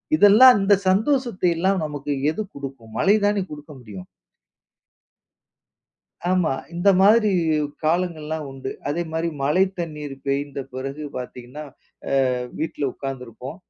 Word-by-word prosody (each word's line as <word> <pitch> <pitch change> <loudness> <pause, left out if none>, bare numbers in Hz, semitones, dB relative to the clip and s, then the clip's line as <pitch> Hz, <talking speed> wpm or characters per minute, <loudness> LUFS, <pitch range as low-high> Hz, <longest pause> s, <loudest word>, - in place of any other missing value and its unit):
இதெல்லாம், 225 +1 +8
இந்த 195 +1 +4
சந்தோஷத்தையெல்லாம் 190 - +1
நமக்கு 145 -1 -4 0.2
எது 190 - -4
குடுக்கும்? 135 -5 -9
மழை 200 +2 +4
தானே 205 -1 +1
குடுக்க 150 +1 -10
முடியும். 100 -6 -10 2.2
ஆமா. 180 -5 +2 0.2
இந்த 175 +4 +1
மாதிரி 215 +2 +5 0.5
காலங்கள்லாம் 160 -2 -1
உண்டு. 135 0 -6 0.2
அதேமாரி 165 +2 -2
மழை 150 +7 +3
தண்ணீர் 150 -4 -5
பெய்ந்த 140 0 -2
பிறகு 135 +3 -5
பார்த்தீங்கன்னா, 125 +3 -7 0.7
அ - - 0 0.2
வீட்ல 155 -2 -3
உட்காந்துருப்போம். 130 +1 -7
155 Hz, 105 wpm, -22 LUFS, 135-190 Hz, 2.2 s, இதெல்லாம்